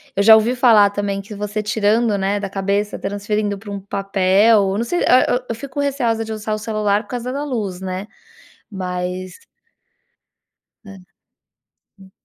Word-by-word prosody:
eu - - +1
já 220 +1 +9
ouvi 225 +3 +2
falar 225 -5 +5
também 200 -1 -3
que 205 +2 -11
você 210 +1 -4
tirando, 215 +1 +1
né, 195 +1 0
da 200 -1 -4
cabeça; 200 +2 -2
transferindo 205 +1 -2
pra 205 +1 -10
um 200 - -4
papel 195 +1 +2
não 230 - 0
sei 350 +9 -2
a 255 - +6
eu 250 +1 0
eu 230 - -2
fico 275 +3 -7
receosa 245 -6 0
de 220 - -5
usar 215 0 -4
o - - -1
celular 215 -1 -1
por - - -24
causa 245 +1 -4
da 285 +2 -3
luz, 210 -10 -3
né. 190 +1 -5 0.6
Mas 180 -1 -4 1.5
É. 195 -1 -11 1.0
Sim. 190 -1 -17
205 Hz, 165 wpm, -19 LUFS, 195-225 Hz, 1.5 s, já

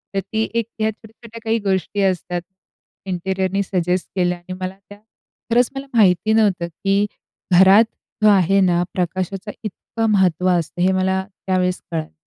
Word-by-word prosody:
तर 195 - +2
ती 220 +4 -2
एक 230 -1 0
ह्या 220 0 +2
छोट्या-छोट्या 225 +1 -14
काही 225 0 +1
गोष्टी 195 0 -1
असतात, 180 -2 0 0.6
इंटीरियरनी 190 +1 -1
सजेस्ट 180 -1 -1
केल्या 180 -1 +1
आहे 175 +1 -9
मला 185 +1 -4
त्या. 205 - -11 0.5
खरंच 240 +1 +4
मला 270 +1 -5
माहिती 195 +1 +4
नव्हतं 200 -6 +2 0.2
की 200 +1 +3 0.5
घरात 195 +4 +7 0.4
जो 215 - +7
आहे 195 -1 +4
ना, 175 -1 +3
प्रकाशाचं 185 +3 -3
इतकं 225 +2 -3
महत्त्व 185 -2 +2
असतं 170 +2 -5
हे 185 - +4
मला 190 0 +1 0.2
त्यावेळेस 180 -1 0
कळालं. 160 -2 -4
190 Hz, 150 wpm, -20 LUFS, 180-210 Hz, 0.6 s, घरात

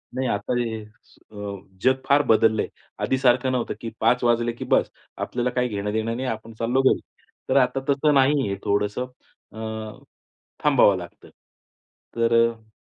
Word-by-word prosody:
नाही 130 0 -1
आता 100 +3 -1
हे 115 -2 -2
अ, 105 0 -22 0.5
जग 130 +1 +5
फार 140 +1 +4
बदललंय, 110 -1 +3 0.4
आधीसारखं 130 -1 +2
नव्हतं 125 -2 -1
की 115 - -4
5:00 120 +3 +2
वाजले 120 0 +2
की 115 - -7
बस, - - +2 0.3
आपल्याला 125 0 -2
काही 125 0 0
घेणं-देणं 110 +1 -2
नाही, 130 +2 -3
आपण 115 -1 -5
चाललो 120 +3 +2
घरी, 135 - +3 0.5
तर - - +3
आता 135 0 +3
तसं 145 +2 +3
नाही 135 -2 +3
आहे 100 - -2
थोडंसं 105 +4 0 0.5
अ, 110 -1 -6 0.7
थांबावं 135 -9 +5
लागतं 90 -1 -11 0.9
तर 115 0 +2 0.2
अ, 110 -1 -15
115 Hz, 150 wpm, -24 LUFS, 110-130 Hz, 0.9 s, जग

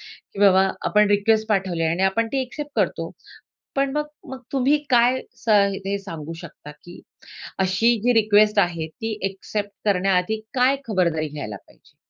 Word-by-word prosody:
की 200 - -14
बाबा 195 -1 +5 0.2
आपण 210 0 +4
रिक्वेस्ट 215 +2 +2
पाठवली 190 -5 0
आहे 160 - +1
आणि 175 +3 0
आपण 225 +4 +1
ती 270 - 0
ॲक्सेप्ट 290 +3 -8
करतो. - - -1 0.6
पण 275 0 +1
मग 300 0 0 0.2
मग 265 -1 -8
तुम्ही 275 +2 +2
काय 245 +1 +4 0.2
स - - -2 0.4
हे 200 +1 -1
सांगू 165 -5 -7
शकता 150 -2 -11
की 175 +4 -14 0.6
अशी 190 +5 +2
जी 245 +1 +3
रिक्वेस्ट 215 -1 +4
आहे 170 -4 +1
ती 220 +6 -5
ॲक्सेप्ट 200 +1 -4 0.2
करण्याआधी 195 +2 +1
काय 260 +2 +3
खबरदारी 170 -6 0
घ्यायला 140 -9 -6
पाहिजे? - - -22
205 Hz, 160 wpm, -22 LUFS, 180-230 Hz, 0.6 s, बाबा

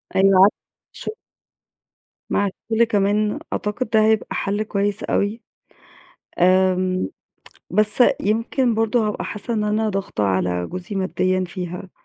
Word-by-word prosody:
أيوه 195 0 +5
عارفة، 200 +2 +7 0.4
ش - - -6 1.2
مع 205 - +1 0.2
الكل 225 +1 +4
كمان 210 -1 +1
أعتقد 210 +4 -3
ده 220 -1 +3
هيبقى 220 -1 +2
حَل 205 +2 -1
كويس 205 -1 -2
أوي، 210 +3 -1 1.0
آمم 185 - +2 0.6
بس 210 +5 +5 0.2
يمكن 230 +4 0
برضه 225 0 +1
هابقى 210 - -3
حاسّة 210 +3 -4
إن 215 -2 0
أنا 215 +1 0
ضاغطة 195 - -3
على 90 -2 0
جوزي 180 +3 -7
مادّيًا 185 -1 0
فيها، 180 0 -6
205 Hz, 125 wpm, -21 LUFS, 185-215 Hz, 1.2 s, عارفة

